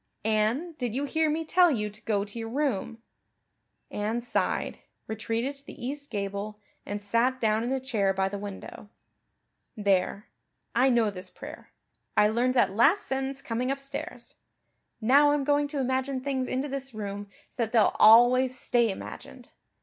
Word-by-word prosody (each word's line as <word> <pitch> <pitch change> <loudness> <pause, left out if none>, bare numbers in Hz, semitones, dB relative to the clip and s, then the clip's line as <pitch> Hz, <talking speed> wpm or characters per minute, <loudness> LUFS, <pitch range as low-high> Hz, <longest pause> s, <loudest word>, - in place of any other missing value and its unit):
"Anne, 220 +10 +1
did 245 -3 -2
you 280 +2 -1
hear 315 +2 +1
me 320 +2 -1
tell 355 +2 +5
you 215 -8 0
to 210 +1 -11
go 205 -2 0
to 210 +3 -7
your 225 0 -5
room?" 235 -4 -2 0.9
Anne 215 +3 -1
sighed, 240 - -1 0.3
retreated 225 +5 -3
to 275 - -6
the 245 - -9
east 285 +2 -4
gable, 200 0 -4 0.3
and 205 0 -4
sat 240 +5 +1
down 220 -1 +1
in 245 - -2
a 265 - 0
chair 220 -7 0
by 190 0 0
the 200 +1 -5
window. 205 0 -8 0.9
"There 200 0 +1 0.5
I 255 +3 +4
know 235 -4 +3
this 185 -1 -7
prayer. - - -11 0.5
I 210 - +6
learned 245 +3 +1
that 220 -6 +3
last 310 - +4
sentence 270 0 -3
coming 245 +2 -2
upstairs. 275 0 -5 0.7
Now 280 +6 +5
I'm 290 -1 0
going 290 +1 +2
to 285 -1 -4
imagine 260 +1 -1
things 260 -1 -2
into 265 +3 -2
this 270 -3 -4
room 205 -1 -5 0.2
so - - -26
that 230 -3 -1
they'll 225 -3 +3
always 245 +3 +6
stay 235 -2 +2
imagined. 195 - -8
240 Hz, 165 wpm, -27 LUFS, 210-270 Hz, 0.9 s, I